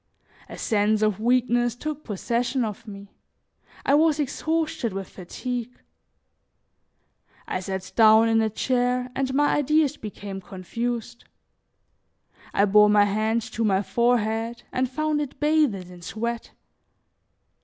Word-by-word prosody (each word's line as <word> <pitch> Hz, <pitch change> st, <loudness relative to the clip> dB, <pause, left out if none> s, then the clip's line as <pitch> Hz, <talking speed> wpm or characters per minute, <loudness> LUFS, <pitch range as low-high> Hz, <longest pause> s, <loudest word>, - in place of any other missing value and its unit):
A -, -, -8 dB
sense 215 Hz, -1 st, +1 dB
of 215 Hz, -2 st, +1 dB
weakness 240 Hz, 0 st, +2 dB
took 305 Hz, +3 st, -5 dB
possession 240 Hz, +4 st, -1 dB
of 215 Hz, +2 st, -7 dB
me; 200 Hz, -1 st, -10 dB, 0.7 s
I 275 Hz, -, +3 dB
was 305 Hz, 0 st, +4 dB
exhausted 310 Hz, -5 st, -1 dB
with 195 Hz, 0 st, -5 dB
fatigue. 245 Hz, +6 st, -6 dB, 1.7 s
I -, -, -2 dB
sat 190 Hz, 0 st, -5 dB
down 220 Hz, 0 st, +6 dB
in 225 Hz, 0 st, +3 dB
a 220 Hz, -, +1 dB
chair 250 Hz, +2 st, 0 dB
and 265 Hz, -1 st, -1 dB
my 290 Hz, +1 st, +3 dB
ideas 300 Hz, 0 st, +2 dB
became 200 Hz, -2 st, -7 dB
confused; 230 Hz, +6 st, -5 dB, 1.3 s
I 200 Hz, -, +3 dB
bore 210 Hz, +1 st, +6 dB
my 205 Hz, 0 st, +5 dB
hand 220 Hz, +3 st, 0 dB
to 230 Hz, -, -1 dB
my 200 Hz, -2 st, +2 dB
forehead 230 Hz, 0 st, 0 dB
and 255 Hz, 0 st, 0 dB
found 305 Hz, +2 st, -1 dB
it 285 Hz, -2 st, -6 dB
bathed 295 Hz, -, +1 dB
in 175 Hz, -1 st, -13 dB
sweat. 235 Hz, +6 st, -4 dB
230 Hz, 125 wpm, -24 LUFS, 210-255 Hz, 1.7 s, down